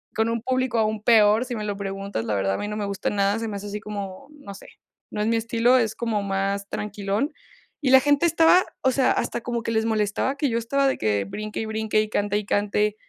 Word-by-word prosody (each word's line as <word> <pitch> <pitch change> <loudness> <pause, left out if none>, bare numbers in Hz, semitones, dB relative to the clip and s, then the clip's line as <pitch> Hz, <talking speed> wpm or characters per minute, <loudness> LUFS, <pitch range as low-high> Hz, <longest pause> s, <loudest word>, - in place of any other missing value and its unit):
con 220 +1 +1
un 230 0 -2
público 255 0 0
aún 215 -1 0
peor. 220 -1 +5
Si 245 - -5
me 215 - -4
lo 205 -1 -2
preguntas, 195 - -4
la 105 - -1
verdad, 95 0 0
a - - -3
mí 205 - -4
no 210 - -4
me 210 - -2
gusta 200 0 -2
nada, 200 +1 +1
se 225 - -3
me 205 -2 -4
hace 205 +1 -7
así 210 +1 -5
como, 200 +2 -7
no 285 -10 -11
sé, - - -13 0.4
no - - -5
es 210 - 0
mi 230 - +2
estilo, 230 +2 +3
es 225 -4 +1
como 225 -3 -1
más 200 0 -2
tranquilón. 205 - -2 0.5
Y 270 - +1
la 265 - +9
gente 290 +4 +2
estaba 330 +2 +5 0.2
o 260 - +3
sea, 260 0 +2
hasta - - -1
como 235 0 -3
que 230 - -2
les 220 0 +1
molestaba 220 +4 0
que 285 -3 0
yo 230 - 0
estaba 275 +4 +1
de 265 - 0
que 105 -2 0
brinque 210 - -6
y - - -3
brinque, 220 0 0
y 215 - -3
cante 205 -1 0
y 210 - -3
cante. 210 +1 0
215 Hz, 250 wpm, -24 LUFS, 200-235 Hz, 0.5 s, la